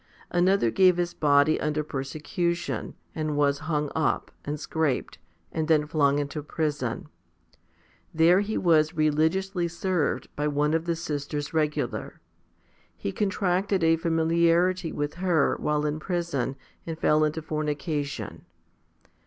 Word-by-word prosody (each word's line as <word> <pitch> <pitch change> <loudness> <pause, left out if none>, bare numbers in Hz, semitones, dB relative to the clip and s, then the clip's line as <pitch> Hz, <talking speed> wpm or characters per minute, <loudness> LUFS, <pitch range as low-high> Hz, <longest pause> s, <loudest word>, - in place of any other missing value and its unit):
Another 175 - +3
gave 185 +2 +5
his 175 0 -1
body 145 +1 +3
under 150 0 0
persecution, 155 +5 -3 0.2
and 155 -2 -2
was 140 -1 +2
hung 150 -2 0
up, 160 - 0
and 145 +1 -4
scraped, 155 - -1 0.3
and 160 -1 -2
then 155 -2 +3
flung 145 -2 +2
into 145 +1 -3
prison. 145 -5 -3 1.0
There 165 +3 +5
he 205 +2 -1
was 160 -2 +3
religiously 165 +4 +1
served 170 -1 -1
by 150 +1 -1
one 150 +1 +1
of 165 0 0
the 170 -1 0
sisters 145 -2 -4
regular. 150 -2 -1 0.8
He 100 - -3
contracted 195 - 0
a 165 0 +5
familiarity 170 +2 +2
with 145 0 -3
her, 170 -6 +2
while 150 0 0
in 150 +1 -1
prison, 170 -7 -2 0.3
and 165 -1 -4
fell 155 -1 +3
into 155 +1 -1
fornication. 150 -1 -3
155 Hz, 130 wpm, -26 LUFS, 150-170 Hz, 1.0 s, gave